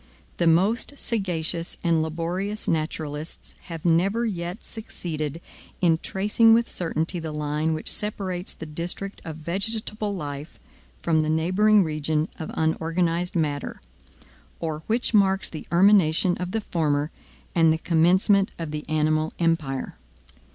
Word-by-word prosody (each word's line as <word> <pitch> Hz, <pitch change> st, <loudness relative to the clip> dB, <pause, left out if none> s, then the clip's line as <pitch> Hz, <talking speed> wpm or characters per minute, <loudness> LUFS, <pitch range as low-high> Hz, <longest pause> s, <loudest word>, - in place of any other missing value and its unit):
The 170 Hz, -, +2 dB
most 200 Hz, -, +3 dB
sagacious 175 Hz, -8 st, -2 dB
and 165 Hz, -2 st, +3 dB
laborious 175 Hz, +6 st, -3 dB
naturalists 155 Hz, -1 st, -3 dB
have 165 Hz, -2 st, -7 dB
never 195 Hz, +8 st, +3 dB
yet 180 Hz, -2 st, -4 dB
succeeded 160 Hz, -8 st, -5 dB, 0.4 s
in 165 Hz, -3 st, +3 dB
tracing 210 Hz, +5 st, +4 dB
with 235 Hz, 0 st, +2 dB
certainty 165 Hz, 0 st, -2 dB
the 160 Hz, -1 st, -5 dB
line 150 Hz, +1 st, -1 dB
which 155 Hz, -, +2 dB
separates 190 Hz, -3 st, -2 dB
the 160 Hz, -, -8 dB
district 170 Hz, +5 st, -4 dB
of 160 Hz, -2 st, -6 dB
vegetable 205 Hz, +5 st, -3 dB
life 145 Hz, -2 st, -6 dB, 0.5 s
from 160 Hz, -2 st, +3 dB
the 155 Hz, -, -1 dB
neighboring 190 Hz, +6 st, +4 dB
region 155 Hz, 0 st, -1 dB
of 160 Hz, -, -5 dB
unorganized 165 Hz, +2 st, 0 dB
matter, 150 Hz, -4 st, -1 dB, 0.8 s
or 155 Hz, -2 st, -3 dB
which 235 Hz, +2 st, +1 dB
marks 195 Hz, -2 st, +3 dB
the 155 Hz, -, -7 dB
termination 180 Hz, -2 st, +4 dB
of 180 Hz, 0 st, -3 dB
the 225 Hz, +4 st, -1 dB
former 150 Hz, -5 st, 0 dB, 0.4 s
and 165 Hz, -2 st, +5 dB
the 160 Hz, -, +2 dB
commencement 185 Hz, +5 st, +3 dB
of 165 Hz, -3 st, -5 dB
the 150 Hz, 0 st, -4 dB
animal 155 Hz, 0 st, +1 dB
empire. 155 Hz, -, -1 dB
170 Hz, 130 wpm, -25 LUFS, 155-195 Hz, 0.8 s, and